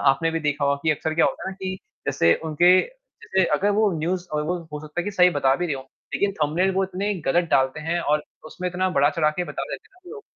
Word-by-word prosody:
आपने 135 +5 +3
भी 165 - -2
देखा 145 -1 0
होगा 140 0 +2
कि 160 - +2
अक्सर 155 +1 -1
क्या 165 - +4
होता - - -3
है - - -2
ना 195 - -10
कि 190 0 -2 0.3
जैसे 85 0 +3
उनके 175 +4 +5 0.4
जैसे 190 -1 +1
अगर 205 +2 +1
वो 215 -2 +4
न्यूज़ 180 +3 -2
और 150 0 0
वो 180 +3 -1 0.2
हो 150 - -5
सकता 155 +3 -4
है - - -4
कि 205 - -2
सही 180 -2 +5
बता 135 -4 +2
भी 175 - -1
रहे 150 - -1
हों, 130 - -6 0.3
लेकिन 200 0 +1
थंबनेल 175 +6 +2
वो 195 0 +2
इतने 195 +2 -2 0.2
गलत 170 +3 +2
डालते 135 +2 +2
हैं, 165 +3 -1
और 150 -2 +1 0.2
उसमें 180 +3 -4
इतना 185 +1 0
बढ़ा-चढ़ा 150 +2 +3
के 180 +3 -3
बता - - -5
देते - - -7
हैं 370 - -26
ना - - -10
लोग, 435 -1 -9
170 Hz, 260 wpm, -24 LUFS, 150-185 Hz, 0.4 s, उनके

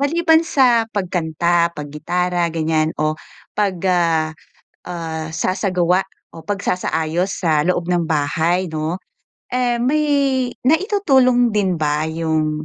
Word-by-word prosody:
Maliban 320 +3 +3
sa 245 -7 +3
pagkanta, 170 -2 0
paggitara 170 +4 -2
ganyan, 160 -1 +1
o 155 0 +1 0.4
pag 200 -3 0
ah, 165 -3 +2 0.6
ah, 160 -2 -5
sasagawa 185 -1 +1 0.3
o 165 - -10
pagsasaayos 180 -3 -1
sa 155 -3 +2
loob 175 -1 0
ng 175 -2 +1
bahay, 160 +5 +1
'no, 160 +3 -3 0.5
eh, 245 -1 +1
may 300 +5 +2 0.6
naitutulong 270 - +3
din 190 -4 +1
ba 150 0 0
yung, 155 -1 -1
175 Hz, 110 wpm, -19 LUFS, 160-210 Hz, 0.6 s, Maliban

